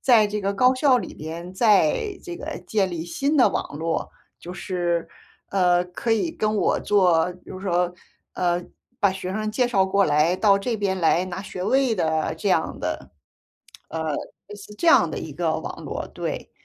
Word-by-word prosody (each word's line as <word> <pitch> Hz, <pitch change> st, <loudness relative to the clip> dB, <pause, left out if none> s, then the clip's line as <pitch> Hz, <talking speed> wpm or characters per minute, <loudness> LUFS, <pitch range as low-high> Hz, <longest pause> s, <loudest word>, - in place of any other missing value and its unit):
在 230 Hz, -5 st, +5 dB
这 210 Hz, 0 st, -3 dB
个 200 Hz, +1 st, -1 dB
高 255 Hz, +5 st, +5 dB
校 255 Hz, -1 st, +4 dB
里 -, -, -6 dB
边 170 Hz, +3 st, -7 dB
再 210 Hz, -, +2 dB
这 350 Hz, -1 st, -7 dB
个 460 Hz, -, -6 dB
建 200 Hz, -3 st, +1 dB
立 165 Hz, -1 st, -4 dB
新 280 Hz, -, -1 dB
的 255 Hz, -, +6 dB
网 -, -, -4 dB
络， 165 Hz, +2 st, -2 dB, 0.3 s
就 175 Hz, -, -8 dB
是 175 Hz, -3 st, -2 dB, 0.4 s
呃， 180 Hz, -2 st, +3 dB
可 180 Hz, +6 st, -4 dB
以 270 Hz, +10 st, +1 dB
跟 215 Hz, -8 st, -1 dB
我 -, -, +1 dB
做， 180 Hz, -4 st, +3 dB
就 185 Hz, -, -8 dB
是 195 Hz, -, -7 dB
说 175 Hz, 0 st, +1 dB, 0.4 s
呃， 175 Hz, 0 st, 0 dB, 0.4 s
把 200 Hz, -, +4 dB
学 185 Hz, -1 st, -5 dB
生 215 Hz, +1 st, -2 dB
介 245 Hz, +3 st, +1 dB
绍 195 Hz, -5 st, +3 dB
过 200 Hz, +1 st, +2 dB
来 155 Hz, +5 st, +3 dB
到 200 Hz, -1 st, +4 dB
这 230 Hz, +3 st, -2 dB
边 195 Hz, -2 st, -1 dB
来 170 Hz, +2 st, +3 dB
拿 185 Hz, +1 st, -5 dB
学 180 Hz, -2 st, -6 dB
位 260 Hz, +2 st, +2 dB
的 160 Hz, -4 st, 0 dB
这 -, -, -1 dB
样 -, -, +1 dB
的 -, -, -4 dB, 0.8 s
呃， 160 Hz, -2 st, -3 dB, 0.3 s
类 205 Hz, -, -9 dB
似 205 Hz, +1 st, -12 dB
这 340 Hz, -, -2 dB
样 -, -, +6 dB
的 -, -, -4 dB
一 -, -, -6 dB
个 -, -, -1 dB
网 -, -, -7 dB
络。 -, -, -4 dB
对。 -, -, -5 dB
190 Hz, 205 characters per minute, -24 LUFS, 175-215 Hz, 0.8 s, 的